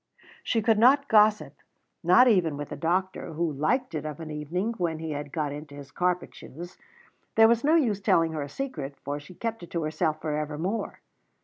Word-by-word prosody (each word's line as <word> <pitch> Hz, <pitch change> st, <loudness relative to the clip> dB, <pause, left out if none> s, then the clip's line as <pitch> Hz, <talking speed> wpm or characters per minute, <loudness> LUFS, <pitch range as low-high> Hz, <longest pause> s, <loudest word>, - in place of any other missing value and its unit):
She 225 Hz, -2 st, 0 dB
could 220 Hz, -1 st, +3 dB
not 275 Hz, +5 st, +5 dB
gossip, 215 Hz, -1 st, +3 dB, 0.5 s
not 185 Hz, +10 st, +6 dB
even 175 Hz, -10 st, +2 dB
with 145 Hz, 0 st, -6 dB
the -, -, -5 dB
doctor, 185 Hz, +1 st, -2 dB
who 165 Hz, 0 st, -1 dB
liked 205 Hz, -, 0 dB
it 155 Hz, -2 st, -3 dB
of 150 Hz, -1 st, -6 dB
an 160 Hz, -1 st, -7 dB
evening 170 Hz, +9 st, -2 dB
when 165 Hz, -3 st, -1 dB
he 160 Hz, 0 st, -5 dB
had 145 Hz, -1 st, -5 dB
got 150 Hz, -2 st, -2 dB
into 145 Hz, 0 st, -8 dB
his 140 Hz, -1 st, -11 dB
carpet 180 Hz, 0 st, -1 dB
shoes. 175 Hz, +6 st, -11 dB, 0.6 s
There 225 Hz, 0 st, +7 dB
was 235 Hz, 0 st, +2 dB
no 305 Hz, +3 st, +4 dB
use 225 Hz, -11 st, +2 dB
telling 165 Hz, -3 st, +3 dB
her 155 Hz, -2 st, -3 dB
a 140 Hz, -, -5 dB
secret, 145 Hz, -, -5 dB
for 145 Hz, +1 st, -3 dB
she 145 Hz, +5 st, -14 dB
kept 225 Hz, +1 st, -4 dB
it 175 Hz, -, -10 dB
to 170 Hz, -2 st, -2 dB
herself 155 Hz, 0 st, -1 dB
for 155 Hz, -1 st, -2 dB
evermore. 155 Hz, +8 st, -3 dB
165 Hz, 205 wpm, -27 LUFS, 150-215 Hz, 0.6 s, There